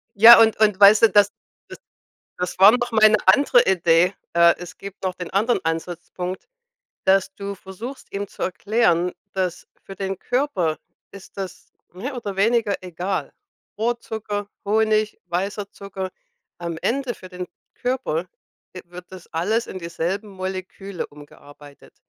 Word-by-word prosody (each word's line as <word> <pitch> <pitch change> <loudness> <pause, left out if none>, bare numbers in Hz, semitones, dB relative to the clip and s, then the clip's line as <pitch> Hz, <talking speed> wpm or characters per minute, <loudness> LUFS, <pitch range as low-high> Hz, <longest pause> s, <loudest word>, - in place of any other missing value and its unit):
Ja, 225 +4 +10
und 225 -1 +5
und 210 -3 +3
weißt 205 +1 +8
du, 225 - +8
das 205 -1 +5 1.1
das 180 0 -4
war 195 +3 +9
noch 245 0 0
meine 215 -1 +6
andere 250 +4 +6
Idee. 175 0 +3 0.2
Äh, 170 0 +5
es 180 0 -10
gibt 195 -1 -10
noch 185 -1 -1
den 180 -2 -7
anderen 220 +5 +1
Ansatzpunkt, 175 - -4 0.6
dass 195 0 +3
du 200 0 -6
versuchst, 200 +8 -9
ihm 200 +1 -3
zu - - -10
erklären, 180 -3 +1 0.2
dass 185 -2 -2 0.2
für 195 - -10
den 195 0 -4
Körper 195 - -1 0.3
ist 200 -1 -13
das 190 -2 -7 0.2
mehr 250 +10 -6
oder 205 -5 -5
weniger 215 0 +2
egal, 180 +2 -4 0.5
Rohrzucker, 220 -3 -3 0.2
Honig, 215 0 +1
weißer 200 +3 -3
Zucker. 190 -1 -7 0.5
Am 170 -2 -5
Ende 260 0 -1
für 185 - -13
den 180 0 -7 0.3
Körper 245 -10 -2 0.5
e 185 - -7
wird 180 +1 -12
das 185 -2 -11
alles 210 +8 0
in 185 - -7
dieselben 175 +4 -3
Moleküle 185 0 -6
umgearbeitet. 145 0 -16
195 Hz, 140 wpm, -22 LUFS, 180-215 Hz, 1.1 s, Ja